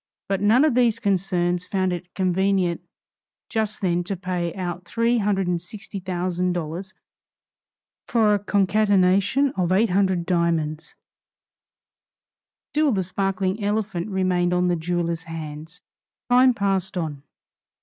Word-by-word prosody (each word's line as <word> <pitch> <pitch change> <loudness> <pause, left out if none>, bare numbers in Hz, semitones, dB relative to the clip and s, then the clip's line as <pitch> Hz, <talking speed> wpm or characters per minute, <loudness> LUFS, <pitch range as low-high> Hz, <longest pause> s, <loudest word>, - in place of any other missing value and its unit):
But 195 -1 -1
none 225 +8 +5
of 305 - +2
these 235 -2 +3
concerns 180 -3 0
found 185 -2 0
it 175 0 -7
convenient 190 -1 +1 0.7
just 220 -1 -1
then 175 -2 +1
to 195 0 -3
pay 180 -2 -2
out 180 -2 -4
three 230 +6 +1
hundred 200 -2 +1
and 175 -1 -1
sixty 200 +2 -8
thousand 180 -1 -1
dollars 175 +3 -5 1.1
for 220 -3 +3
a 205 - +2
concatenation 200 +5 +2
of 180 -8 -1
eight 205 +2 +3
hundred 185 -2 +1
diamonds; 165 -3 -1
and - - -65
still 300 -1 +2
the 195 -4 0
sparkling 195 +2 -1
elephant 205 -3 -1
remained 180 -2 +1
on 180 0 +2
the 175 - +2
jewelers' 170 0 -2
hands. 160 +2 -8 0.5
Time 250 0 +6
passed 195 -2 0
on. 155 -5 -3
185 Hz, 130 wpm, -23 LUFS, 175-205 Hz, 1.1 s, Time